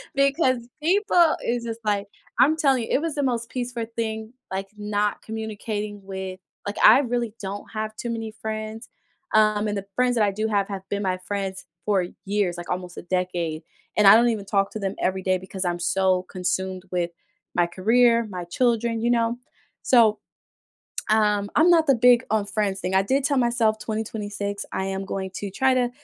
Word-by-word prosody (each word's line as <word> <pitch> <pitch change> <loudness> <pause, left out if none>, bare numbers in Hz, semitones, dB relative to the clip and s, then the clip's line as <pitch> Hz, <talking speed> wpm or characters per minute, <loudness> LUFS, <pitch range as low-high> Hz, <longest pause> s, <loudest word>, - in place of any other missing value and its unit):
Because 275 -1 +3 0.2
people 350 -1 +4
is 235 0 -1
just 230 -1 -5
like 205 -1 0 0.3
I'm 310 +4 +5
telling 275 -5 +3
you, - - -6
it - - +3
was 330 -2 -2
the 290 - 0
most 235 -3 -1
peaceful 245 -2 -3
thing, 220 0 -3 0.2
like, 195 +1 -3
not 210 0 -1
communicating 215 -2 -5
with 190 -1 -6 0.3
Like, 205 - -4
I - - +9
really 240 -3 -2
don't 200 0 -5
have 215 0 -3
too 235 - -5
many 225 -1 -4
friends, 220 +1 -5 0.5
um, 215 0 +4
and 205 - -2
the 200 - -5
friends 250 -1 +2
that 220 - +3
I 200 - +1
do 215 +3 -2
have, 200 -2 +1
have 195 -2 -4
been 205 0 -2
my 185 -1 0
friends 195 0 -4 0.2
for 195 -4 +2 0.2
years, 195 -3 0
like, 175 - -8
almost 180 -1 -4
a - - -7
decade, 175 -3 -2 0.3
and 210 -1 +5
I 195 - +10
don't 240 +1 +5
even 210 -3 -2
talk 195 -1 +1
to 215 - -5
them 195 -1 -2
everyday, 185 0 0
because 190 0 -6
I'm 175 0 0
so 185 +1 +2
consumed 185 0 -2
with 175 -1 -1 0.4
my 175 0 +3
career, 230 +6 +3
my 180 -2 -5
children, 230 +3 0
you 235 - +2
know? 235 0 +1 0.5
So, 225 -4 +5 0.9
um, 210 -2 +2
I'm 320 +4 +6
not 325 -2 +5
the 275 - +5
big 245 +1 +5
on 215 -1 +1
friends 205 -2 -1
thing. 185 +1 -2
I 190 - +5
did 265 +7 0
tell 285 0 +2
myself, 235 -3 +2
"2026, 205 -2 -4
I 190 - -1
am 195 0 -3
going 190 -1 -4
to 205 - -4
try 265 +6 +2
to, 245 -1 +1
215 Hz, 190 wpm, -24 LUFS, 195-235 Hz, 0.9 s, I